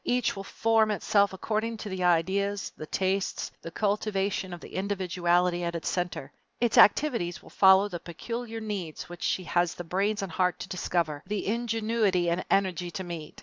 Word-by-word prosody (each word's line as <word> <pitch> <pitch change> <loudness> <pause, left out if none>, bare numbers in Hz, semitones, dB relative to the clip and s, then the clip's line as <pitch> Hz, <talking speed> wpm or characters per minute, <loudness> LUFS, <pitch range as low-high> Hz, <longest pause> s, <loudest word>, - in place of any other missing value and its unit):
Each 245 -3 +1
will 195 - -6
form 225 +1 +2
itself 200 -1 +2
according 220 +4 -2
to 215 - -6
the 185 -1 -3
ideas, 190 +4 +1
the 155 - -8
tastes, 190 +2 -1
and - - -32
the - - -6
cultivation 200 -1 -1
of 175 - -6
the - - -12
individuality 180 -2 +1
at 170 0 -2
its 165 - -2
center. 175 -6 -3 0.3
Its 235 -2 +3
activities 210 - +4
will - - -15
follow 190 +1 +6
the 175 -4 -6
peculiar 225 +7 -6
needs 200 -9 -5
which 175 - -10
she 185 - 0
has 175 -1 +1
the 175 - -6
brains 195 +4 0
and 190 - -5
heart 180 +2 +1
to - - -5
discover, 170 -5 -1
the 210 -1 -2
ingenuity 220 -5 +1
and 170 - -1
energy 185 -2 +1
to 190 +2 -5
meet. 170 -4 -7
190 Hz, 185 wpm, -28 LUFS, 175-210 Hz, 0.3 s, follow